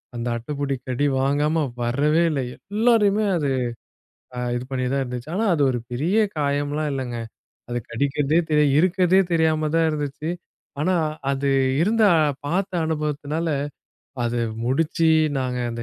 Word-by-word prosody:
அந்த 120 Hz, 0 st, -3 dB
அட்டைப்பூச்சி 140 Hz, +3 st, -3 dB
கடி 130 Hz, +3 st, 0 dB
வாங்காம 145 Hz, +4 st, +1 dB, 0.2 s
வரவே 145 Hz, +7 st, +2 dB
இல்லை. 140 Hz, -3 st, -1 dB, 0.3 s
எல்லாரையுமே 215 Hz, -2 st, +3 dB
அது 145 Hz, -4 st, 0 dB, 0.9 s
ஆ -, -, -2 dB, 0.2 s
இது 120 Hz, -, -5 dB
பண்ணித்தான் 130 Hz, +1 st, 0 dB
இருந்தது. 125 Hz, 0 st, -6 dB
ஆனால் 215 Hz, 0 st, +2 dB
அது 150 Hz, -4 st, +2 dB
ஒரு 120 Hz, -, -2 dB
பெரிய 155 Hz, -, 0 dB, 0.2 s
காயம்லாம் 145 Hz, +1 st, -1 dB
இல்லைங்க. 125 Hz, -3 st, -4 dB, 0.5 s
அது 120 Hz, 0 st, -1 dB
கடிக்கிறதே 140 Hz, +5 st, +1 dB
தெரிய 150 Hz, -1 st, +4 dB
இருக்கிறதே 185 Hz, +2 st, +4 dB
தெரியாம 160 Hz, -2 st, +2 dB
தான் 165 Hz, 0 st, +3 dB
இருந்துச்சு. 150 Hz, +1 st, -3 dB, 0.5 s
ஆனா 185 Hz, +4 st, +2 dB, 0.4 s
அது 140 Hz, 0 st, 0 dB, 0.3 s
இருந்த 220 Hz, +5 st, +2 dB, 0.4 s
பார்த்த 185 Hz, +5 st, -1 dB
அனுபவத்தினால, 150 Hz, +1 st, -2 dB, 0.8 s
அதை 120 Hz, 0 st, -1 dB, 0.2 s
முடித்து 160 Hz, +5 st, +2 dB, 0.3 s
நாங்கள் 125 Hz, -2 st, -2 dB
அந்த 115 Hz, 0 st, -5 dB
150 Hz, 130 wpm, -23 LUFS, 130-165 Hz, 0.9 s, தெரிய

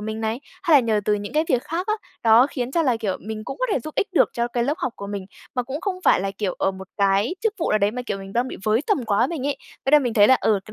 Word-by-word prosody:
mình 220 Hz, +1 st, -4 dB
này, 225 Hz, +3 st, -2 dB, 0.2 s
hay 325 Hz, -3 st, +6 dB
là -, -, +6 dB
nhờ 220 Hz, -3 st, +1 dB
từ 210 Hz, -, +2 dB
những 205 Hz, 0 st, -5 dB
cái 310 Hz, +1 st, +2 dB
việc 250 Hz, -1 st, +2 dB
khác 345 Hz, +4 st, -3 dB
á, 430 Hz, -, +1 dB, 0.3 s
đó 230 Hz, +3 st, +6 dB
khiến 250 Hz, -1 st, -3 dB
cho 335 Hz, -, +2 dB
là, 255 Hz, -6 st, +2 dB
kiểu, 210 Hz, -4 st, -2 dB
mình 215 Hz, +1 st, -6 dB
cũng -, -, -6 dB
có -, -, 0 dB
thể -, -, +2 dB
giúp 310 Hz, +6 st, -8 dB
ích 400 Hz, -, 0 dB
được 355 Hz, -, +4 dB
cho 235 Hz, 0 st, -1 dB
cái 240 Hz, 0 st, -1 dB
lớp 285 Hz, +4 st, 0 dB
học 260 Hz, -, -2 dB
của 200 Hz, -, -7 dB
mình, 200 Hz, -2 st, -5 dB, 0.3 s
mà 250 Hz, -, 0 dB
cũng 270 Hz, +5 st, -5 dB
không 395 Hz, -2 st, -2 dB
phải -, -, +5 dB
là, 195 Hz, +1 st, -2 dB
kiểu, 200 Hz, -4 st, -1 dB
ở -, -, +2 dB
một 190 Hz, 0 st, -10 dB
cái 200 Hz, -, +2 dB
chức 445 Hz, -1 st, 0 dB
vụ 335 Hz, -, -1 dB
nào 215 Hz, -, +3 dB
đấy 200 Hz, 0 st, +2 dB
mà, 250 Hz, +3 st, -5 dB
kiểu, 200 Hz, -, -2 dB
mình 195 Hz, 0 st, -9 dB
đang 240 Hz, +3 st, 0 dB
bị -, -, -7 dB
với 215 Hz, +2 st, +3 dB
tầm 345 Hz, -, +1 dB
quá 210 Hz, +2 st, +2 dB
mình 280 Hz, -3 st, -4 dB
ấy 285 Hz, -, -1 dB, 0.3 s
thế 270 Hz, -, +1 dB
là 300 Hz, -, +9 dB
mình 245 Hz, -5 st, -2 dB
thấy 205 Hz, -1 st, +6 dB
là, 260 Hz, -, +7 dB
ừ, 215 Hz, -2 st, +2 dB
cái 215 Hz, -, -12 dB
235 Hz, 330 wpm, -23 LUFS, 210-275 Hz, 0.3 s, là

